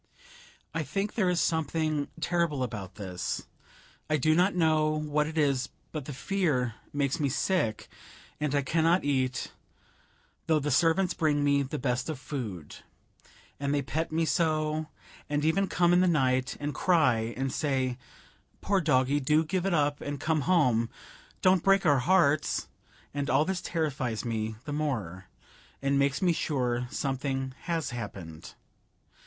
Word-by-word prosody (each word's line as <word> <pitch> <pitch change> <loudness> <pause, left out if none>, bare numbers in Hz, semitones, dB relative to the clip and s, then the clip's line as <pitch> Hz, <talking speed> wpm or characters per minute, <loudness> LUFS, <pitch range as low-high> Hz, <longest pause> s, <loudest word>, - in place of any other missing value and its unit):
I 160 - -1
think 195 +9 -2
there 190 -6 +2
is 180 -1 +1
something 155 -2 0
terrible 170 -5 0
about 105 -6 -5
this. 90 -4 -4 0.6
I 155 - +3
do 155 +3 +3
not 180 +4 +3
know 155 -3 +3
what 150 0 0
it 160 +1 -6
is, 140 -3 +1 0.2
but 150 -4 -5
the 145 - -6
fear 140 - 0 0.2
makes 140 0 0
me 145 -2 +1
sick, 125 - 0 0.5
and 150 -1 0
I 140 - +2
cannot 165 +5 +2
eat, 130 -3 0 1.0
though 160 - +4
the 150 0 -1
servants 165 +6 +3
bring 150 -2 +1
me 140 0 +3
the 140 +2 -3
best 125 0 -1
of 155 - -3
food; 110 - -6 0.8
and 140 0 0
they 140 - 0
pet 160 +5 -2
me 165 +1 +1
so, 155 -2 0 0.4
and 145 0 0
even 190 +5 +2
come 175 -1 +3
in 180 - +5
the 185 - +4
night, 130 -5 +1
and 145 0 -3
cry, 125 -9 +2
and 135 0 -2
say, 130 -4 -1 0.6
"Poor 195 -1 +1
doggie 140 -2 +2
do 150 +3 +2
give 185 +4 -1
it 195 - +1
up 145 -2 +1
and 145 -1 -4
come 155 +1 +1
home; 125 -10 +2 0.5
don't 185 -1 +5
break 195 +1 +3
our 145 -3 +5
hearts!" 160 -1 +2 0.5
and 145 0 -2
all 150 - +3
this 190 0 -2
terrifies 135 -9 -2
me 110 -1 -2
the 145 - -4
more, 110 - -3 0.5
and 140 0 +1
makes 140 +4 +1
me 175 -2 +4
sure 125 -6 -1
something 135 -1 -2
has 165 -5 -1
happened. 95 -9 -7
145 Hz, 155 wpm, -29 LUFS, 130-160 Hz, 1.0 s, in